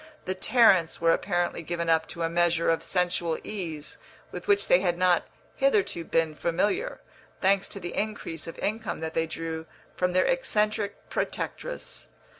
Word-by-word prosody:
The 185 Hz, -, -1 dB
Tarrants 190 Hz, -4 st, +4 dB
were 165 Hz, 0 st, +4 dB
apparently 175 Hz, -1 st, 0 dB
given 170 Hz, 0 st, -3 dB
up 160 Hz, -1 st, +3 dB
to 170 Hz, -, -5 dB
a -, -, +2 dB
measure 170 Hz, 0 st, +2 dB
of 165 Hz, -, 0 dB
sensual 175 Hz, -2 st, 0 dB
ease 165 Hz, -8 st, -6 dB, 0.3 s
with 180 Hz, -, -7 dB
which 200 Hz, 0 st, +3 dB
they 175 Hz, -, +6 dB
had 175 Hz, -2 st, 0 dB
not 180 Hz, -1 st, +3 dB, 0.3 s
hitherto 430 Hz, -, +2 dB
been 165 Hz, -1 st, +1 dB
familiar, 205 Hz, -, -1 dB, 0.4 s
thanks 195 Hz, 0 st, +3 dB
to 200 Hz, -, -7 dB
the 175 Hz, -2 st, -6 dB
increase 200 Hz, -7 st, -3 dB
of 165 Hz, -, -7 dB
income 215 Hz, -5 st, -2 dB
that 160 Hz, 0 st, -4 dB
they 165 Hz, 0 st, 0 dB
drew 160 Hz, 0 st, -5 dB, 0.3 s
from 180 Hz, 0 st, 0 dB
their 185 Hz, -, +4 dB
eccentric 215 Hz, -6 st, 0 dB
protectress. -, -, -4 dB
175 Hz, 160 wpm, -27 LUFS, 165-205 Hz, 0.4 s, they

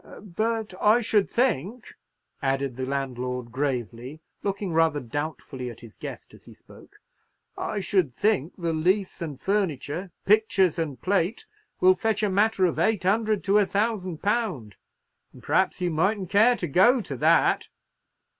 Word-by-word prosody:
But 220 Hz, -1 st, -1 dB
I 215 Hz, +3 st, +5 dB
should 210 Hz, -3 st, +1 dB
think," 235 Hz, -, -1 dB, 0.5 s
added 135 Hz, -2 st, -1 dB
the 130 Hz, 0 st, -4 dB
landlord, 125 Hz, -3 st, -3 dB
gravely, 130 Hz, 0 st, -3 dB, 0.2 s
looking 200 Hz, -3 st, -3 dB
rather 160 Hz, -2 st, +3 dB
doubtfully 140 Hz, -1 st, -5 dB
at 115 Hz, -, -11 dB
his 115 Hz, -3 st, -13 dB
guest -, -, -9 dB
as -, -, -16 dB
he -, -, -14 dB
spoke, -, -, -18 dB, 0.6 s
"I 205 Hz, -, -3 dB
should 185 Hz, -7 st, +1 dB
think 185 Hz, -, 0 dB
the 170 Hz, -3 st, -2 dB
lease 185 Hz, +4 st, 0 dB
and 150 Hz, -5 st, -5 dB
furniture, 185 Hz, -3 st, -2 dB, 0.2 s
pictures 195 Hz, -5 st, +3 dB
and 145 Hz, -6 st, -3 dB
plate, 190 Hz, -, 0 dB, 0.3 s
will 185 Hz, +1 st, +6 dB
fetch 215 Hz, +3 st, -1 dB
a 205 Hz, -, +1 dB
matter 205 Hz, 0 st, +2 dB
of 170 Hz, -, -1 dB
eight 215 Hz, -4 st, +1 dB
hundred 215 Hz, +2 st, +1 dB
to 200 Hz, +1 st, +4 dB
a 205 Hz, -, +3 dB
thousand 200 Hz, -5 st, -2 dB
pound; 200 Hz, -, -1 dB, 0.6 s
and -, -, -15 dB
perhaps -, -, +1 dB
you 175 Hz, -1 st, 0 dB
mightn't 190 Hz, +4 st, 0 dB
care 225 Hz, +5 st, +5 dB
to 175 Hz, -, -4 dB
go 215 Hz, -, +4 dB
to 140 Hz, -, -6 dB
that?" -, -, +3 dB
185 Hz, 155 wpm, -25 LUFS, 140-210 Hz, 0.6 s, will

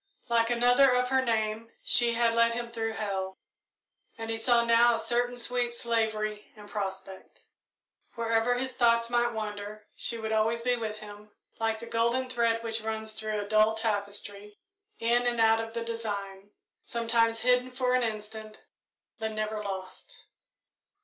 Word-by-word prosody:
Like 230 Hz, -1 st, +3 dB
another 245 Hz, +2 st, +5 dB
of 250 Hz, 0 st, +1 dB
her 265 Hz, 0 st, +3 dB
name 220 Hz, -1 st, -1 dB
she 240 Hz, -1 st, +3 dB
had 230 Hz, 0 st, +2 dB
led 230 Hz, 0 st, +4 dB
him 235 Hz, 0 st, -4 dB
through 225 Hz, -1 st, -2 dB
hell, 195 Hz, -3 st, -3 dB, 0.8 s
and 225 Hz, 0 st, -4 dB
he -, -, 0 dB
saw 235 Hz, +1 st, +3 dB
now 235 Hz, 0 st, +5 dB
a -, -, -3 dB
certain 245 Hz, +2 st, 0 dB
sweet 245 Hz, 0 st, 0 dB
slavery 220 Hz, -3 st, -1 dB
in 210 Hz, -1 st, -13 dB
prospect. 195 Hz, -2 st, -6 dB, 0.7 s
Wherever 230 Hz, +1 st, +1 dB
his 260 Hz, +1 st, -2 dB
thoughts 235 Hz, -1 st, +3 dB
might 240 Hz, 0 st, +2 dB
wander, 210 Hz, -1 st, -6 dB
she 235 Hz, -, -3 dB
would 220 Hz, -1 st, -4 dB
always 220 Hz, +2 st, +1 dB
be 250 Hz, +1 st, +2 dB
with 220 Hz, -2 st, -4 dB
him, 210 Hz, 0 st, -11 dB, 0.3 s
like 225 Hz, -1 st, 0 dB
the 235 Hz, -, -8 dB
golden 235 Hz, +3 st, 0 dB
thread 230 Hz, -2 st, +1 dB
which 225 Hz, 0 st, -1 dB
runs 220 Hz, 0 st, -3 dB
through 215 Hz, -1 st, -3 dB
a 205 Hz, -, -6 dB
dull 215 Hz, +1 st, +4 dB
tapestry, 205 Hz, -1 st, -3 dB, 0.4 s
in 240 Hz, +1 st, +2 dB
and 240 Hz, -1 st, 0 dB
out 225 Hz, 0 st, +5 dB
of 225 Hz, 0 st, -4 dB
the 230 Hz, -, -2 dB
design, 205 Hz, -4 st, -5 dB, 0.3 s
sometimes 230 Hz, -1 st, +1 dB
hidden 250 Hz, 0 st, +3 dB
for 250 Hz, 0 st, 0 dB
an 255 Hz, -, +3 dB
instant, 215 Hz, -1 st, -5 dB, 0.6 s
but 220 Hz, 0 st, -3 dB
never 215 Hz, 0 st, -3 dB
lost. 190 Hz, -2 st, -7 dB
225 Hz, 160 wpm, -29 LUFS, 215-235 Hz, 0.8 s, another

